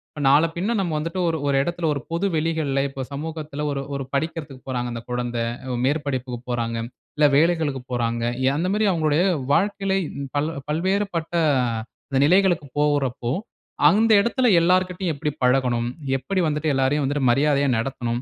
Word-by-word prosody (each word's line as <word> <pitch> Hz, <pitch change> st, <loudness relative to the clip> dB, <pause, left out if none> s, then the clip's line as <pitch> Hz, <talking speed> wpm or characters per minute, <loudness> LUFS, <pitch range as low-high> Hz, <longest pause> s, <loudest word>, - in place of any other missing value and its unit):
இப்ப 150 Hz, -, -5 dB
நாள 145 Hz, +4 st, +5 dB
பின்ன 200 Hz, +7 st, -1 dB
நாம 175 Hz, -4 st, -1 dB
வந்துட்டு 165 Hz, +4 st, -3 dB
ஒரு 160 Hz, -, -1 dB
ஒரு 140 Hz, -, +2 dB
எடத்தில 170 Hz, +3 st, -2 dB
ஒரு 140 Hz, -, -4 dB
பொது 170 Hz, +4 st, 0 dB
வெளிகள்ல 155 Hz, -4 st, 0 dB
இப்போ 135 Hz, 0 st, -7 dB
சமூகத்தில 150 Hz, 0 st, -5 dB
ஒரு, 140 Hz, -1 st, -2 dB
ஒரு 140 Hz, -, -3 dB
படிக்கிறதுக்கு 145 Hz, -2 st, -3 dB
போறாங்க 125 Hz, -2 st, -2 dB
அந்த 115 Hz, -1 st, -5 dB
குழந்தை. 120 Hz, -1 st, -2 dB, 0.4 s
மேற்படிப்புக்கு 130 Hz, -4 st, -2 dB
போறாங்க. 115 Hz, -1 st, -1 dB, 0.4 s
இல்ல 150 Hz, -, +5 dB
வேலைகளுக்குப் 150 Hz, -6 st, +1 dB
போறாங்க. 115 Hz, -1 st, -1 dB, 0.3 s
அந்த 170 Hz, +4 st, 0 dB
மாதிரி 215 Hz, +1 st, +2 dB
அவங்களுடைய 160 Hz, -1 st, +2 dB, 0.3 s
வாழ்க்கையில 195 Hz, +2 st, +1 dB, 0.4 s
பல 155 Hz, +3 st, 0 dB, 0.2 s
பல்வேறுபட்ட 180 Hz, +1 st, -1 dB, 0.9 s
நிலைகளுக்கு 175 Hz, -2 st, +3 dB
போகுறப்போ, 140 Hz, -5 st, 0 dB, 0.6 s
அந்த 220 Hz, +2 st, +3 dB
எடத்தில 245 Hz, +3 st, +2 dB
எல்லார் 185 Hz, +2 st, +3 dB
கிட்டயும் 180 Hz, -2 st, -2 dB
எப்படி 150 Hz, +1 st, -2 dB
பழகணும்? 125 Hz, -2 st, +2 dB, 0.3 s
எப்படி 185 Hz, +9 st, -1 dB
வந்துட்டு 150 Hz, 0 st, 0 dB
எல்லோரையும் 135 Hz, +2 st, +1 dB
வந்துட்டு 135 Hz, -2 st, +1 dB
மரியாதையா 140 Hz, +1 st, +2 dB
நடத்தணும்? 120 Hz, 0 st, -2 dB
150 Hz, 145 wpm, -23 LUFS, 130-170 Hz, 0.9 s, நாள